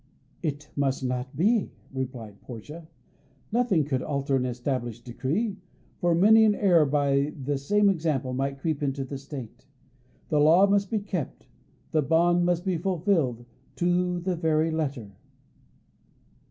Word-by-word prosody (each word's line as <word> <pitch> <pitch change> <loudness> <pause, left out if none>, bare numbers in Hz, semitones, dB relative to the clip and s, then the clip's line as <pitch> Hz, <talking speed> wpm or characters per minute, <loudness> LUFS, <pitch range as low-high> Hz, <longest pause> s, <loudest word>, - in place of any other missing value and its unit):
"It 145 -2 -4
must 135 -2 0
not 125 +1 -3
be," 210 +5 +2 0.2
replied 125 -6 -6
Portia. 150 +8 -10 0.6
Nothing 215 - +2
could 135 -3 -1
alter 140 -1 -1
an 130 -1 0
established 120 -2 -3
decree, 170 - -2 0.4
for 175 -1 +2
many 220 +5 +6
an 215 -1 +4
error 175 -8 +4
by 140 0 +1
the 140 +2 -1
same 205 +9 +2
example 155 -9 0
might 135 +1 -2
creep 150 +1 -2
into 135 -1 -1
the 135 +1 -6
State. 135 -4 -9 0.6
The 150 - +2
law 165 +6 +6
must 200 -1 +1
be 225 - 0
kept; 185 -7 -5 0.5
the 155 - +2
bond 175 +3 +3
must 175 +1 0
be 185 -3 0
fulfilled 165 - 0 0.3
to 180 0 +1
the 180 +1 -2
very 160 -1 +1
letter. 140 -9 -3
150 Hz, 140 wpm, -26 LUFS, 135-175 Hz, 0.6 s, many